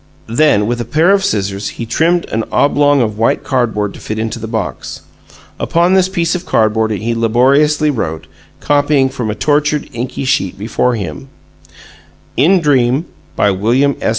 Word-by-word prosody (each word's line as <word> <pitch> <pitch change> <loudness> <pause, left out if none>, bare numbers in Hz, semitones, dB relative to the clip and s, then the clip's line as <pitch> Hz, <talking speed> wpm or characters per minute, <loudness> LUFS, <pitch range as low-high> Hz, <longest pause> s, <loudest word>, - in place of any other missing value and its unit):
Then, 130 -7 +3
with 120 +2 -2
a - - -2
pair 155 - +2
of 200 -1 +2
scissors, 100 - -2
he 115 - -4
trimmed 165 +9 +1
an 110 0 -1
oblong 145 -1 +3
of 110 -1 -4
white 115 - +1
cardboard 110 -6 -1
to - - -12
fit 110 - -5
into 110 +1 -3
the 110 - -6
box. 110 -1 -5 0.6
Upon 175 +2 +1
this 190 -1 +3
piece 170 -3 -1
of 180 -1 -3
cardboard 110 - +1
he 110 +2 -2
laboriously 135 +7 +2
wrote, 80 - -4 0.3
copying 145 -2 +2
from 125 -4 -4
a 105 - -2
tortured, 150 +3 0
inky 125 +3 -4
sheet 95 -8 0
before 120 +4 -1
him: 75 -10 -6 1.1
IN 175 +8 +3
DREAM 135 0 +2 0.3
BY 105 - +2
WILLIAM 120 +9 +1
S. - - 0
125 Hz, 165 wpm, -15 LUFS, 110-150 Hz, 1.1 s, Then